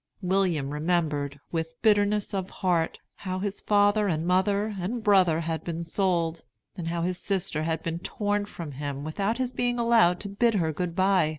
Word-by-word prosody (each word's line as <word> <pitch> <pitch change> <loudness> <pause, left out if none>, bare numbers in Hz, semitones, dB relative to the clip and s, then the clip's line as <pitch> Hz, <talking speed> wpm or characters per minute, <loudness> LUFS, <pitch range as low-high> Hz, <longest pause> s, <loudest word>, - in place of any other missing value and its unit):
William 180 -7 +1
remembered, 150 -3 -1
with 165 -1 -3
bitterness 210 -1 +3
of 190 -1 -2
heart, 175 -3 0 0.2
how 185 -1 -4
his 200 +1 -3
father 205 0 +3
and 160 -3 -1
mother 200 +4 +1
and 220 +6 -3
brother 185 -6 +4
had 165 -1 -3
been 170 0 -4
sold, 170 -2 0 0.3
and 175 -4 -5
how 170 0 -1
his 180 0 -2
sister 195 -5 -1
had 160 0 -2
been 165 0 -3
torn 205 +2 -1
from 165 -6 -7
him 140 0 -5
without 195 +8 -1
his 255 -1 -2
being 245 0 0
allowed 230 -7 +4
to 205 - -5
bid 220 +3 +1
her 160 -5 +1
good 170 +2 -3
by. 185 -4 +3
180 Hz, 180 wpm, -27 LUFS, 165-205 Hz, 0.3 s, brother